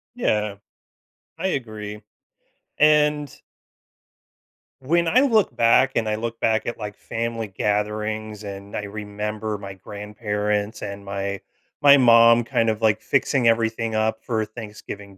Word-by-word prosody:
Yeah. 105 Hz, -, 0 dB, 0.8 s
I 190 Hz, +3 st, -1 dB
agree. 105 Hz, -, -4 dB, 0.8 s
And 150 Hz, -1 st, +3 dB, 1.5 s
when 170 Hz, +5 st, +1 dB
I 215 Hz, +10 st, +4 dB
look 230 Hz, -7 st, +3 dB
back 115 Hz, +3 st, +4 dB
and 110 Hz, -2 st, 0 dB
I 105 Hz, -, 0 dB
look 115 Hz, +1 st, -5 dB
back 110 Hz, -1 st, +1 dB
at, 120 Hz, -, -4 dB
like, 105 Hz, -1 st, -6 dB
family 115 Hz, -1 st, -4 dB
gatherings, 105 Hz, +1 st, -2 dB
and 100 Hz, 0 st, -8 dB
I 105 Hz, -, -3 dB
remember 105 Hz, +1 st, -4 dB
my 100 Hz, -1 st, -8 dB
grandparents 105 Hz, +1 st, -3 dB
and 100 Hz, 0 st, -6 dB
my 100 Hz, 0 st, -4 dB, 0.4 s
my 140 Hz, 0 st, +9 dB
mom 115 Hz, -1 st, +6 dB
kind 115 Hz, 0 st, 0 dB
of, 110 Hz, 0 st, -2 dB
like, 110 Hz, -3 st, +3 dB
fixing 135 Hz, -3 st, +1 dB
everything 115 Hz, 0 st, +1 dB
up 110 Hz, 0 st, 0 dB
for 110 Hz, -3 st, -1 dB
Thanksgiving 105 Hz, -3 st, -9 dB
110 Hz, 130 wpm, -23 LUFS, 105-115 Hz, 1.5 s, my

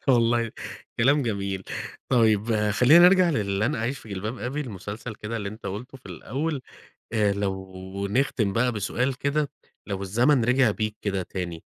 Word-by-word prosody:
والله 115 Hz, -2 st, +3 dB, 0.5 s
كلام 140 Hz, +5 st, +4 dB
جميل، 100 Hz, -5 st, -2 dB, 0.4 s
طيب 110 Hz, -3 st, +3 dB
خلّينا 145 Hz, +11 st, +7 dB
نرجع 185 Hz, -2 st, +4 dB
للن 105 Hz, +2 st, 0 dB
أعيش 120 Hz, +4 st, -2 dB
في -, -, -14 dB
جلباب 105 Hz, +5 st, -4 dB
أبي، 130 Hz, +7 st, -3 dB
المسلسل 110 Hz, -1 st, -6 dB
كده 105 Hz, +2 st, -5 dB
اللي 100 Hz, -3 st, -3 dB
أنت 110 Hz, 0 st, -9 dB
قُلته 115 Hz, +8 st, -6 dB
في -, -, -16 dB
الأول، 135 Hz, -, -3 dB, 0.5 s
آآ 105 Hz, -2 st, +3 dB
لو 95 Hz, 0 st, -4 dB
نختم 110 Hz, -3 st, +1 dB
بَقى 125 Hz, +2 st, +2 dB
بسؤال 120 Hz, +5 st, -1 dB
كده، 140 Hz, +1 st, 0 dB, 0.4 s
لو 100 Hz, -1 st, -3 dB
الزمن 120 Hz, +6 st, +3 dB
رجع 125 Hz, -3 st, +4 dB
بيك 110 Hz, 0 st, -3 dB
كده 95 Hz, -3 st, -1 dB
تاني، 90 Hz, -3 st, -5 dB
110 Hz, 155 wpm, -25 LUFS, 100-125 Hz, 0.5 s, خلّينا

